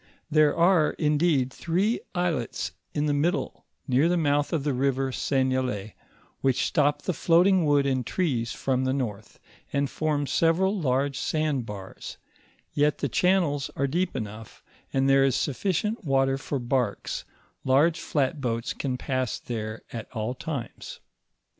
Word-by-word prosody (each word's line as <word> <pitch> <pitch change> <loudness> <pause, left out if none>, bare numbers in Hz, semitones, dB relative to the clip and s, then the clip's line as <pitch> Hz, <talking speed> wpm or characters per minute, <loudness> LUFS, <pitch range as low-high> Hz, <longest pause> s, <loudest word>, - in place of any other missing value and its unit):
There 155 -1 +4
are, 170 -2 +4
indeed, 150 -4 +1
three 190 +7 0 0.2
islets 170 -10 -1 0.2
in 145 - -1
the 145 - +1
mid 155 +5 +2
dle, - - -5 0.2
near 135 +5 +3
the 180 - +2
mouth 145 -2 +1
of 160 -5 0
the 145 -1 0
river 135 +1 0
Seignelay, 130 -6 -1 0.5
which 135 -2 +1
stop 145 -2 +1
the 185 - -1
floating 175 +2 +4
wood 145 -1 +3
and 130 -2 +1
trees 120 - -1
from 130 -1 -1
the 130 +1 0
north, 110 -6 -5 0.3
and 140 0 +1
form 150 -2 0
several 170 +7 +2
large 140 -5 0
sand 150 -6 -1
bars, 100 -2 -8 0.6
yet 150 0 +2
the 140 - -2
channels 170 -3 +2
are 140 - +1
deep 175 +5 -1
enough, 110 -2 -7 0.3
and 135 0 +2
there 135 0 +5
is 135 -2 +2
sufficient; 195 - -1
water 135 -2 +2
foi 140 - -3
barks; 125 -4 -1 0.4
large 150 +6 +3
flat 145 0 -1
boats 115 -2 -2
can 130 -3 -3
pass 130 -3 -2
there 110 -2 -5
at 115 -1 -6
all 110 +1 -2
times. 135 -4 -6
140 Hz, 150 wpm, -26 LUFS, 130-160 Hz, 0.6 s, there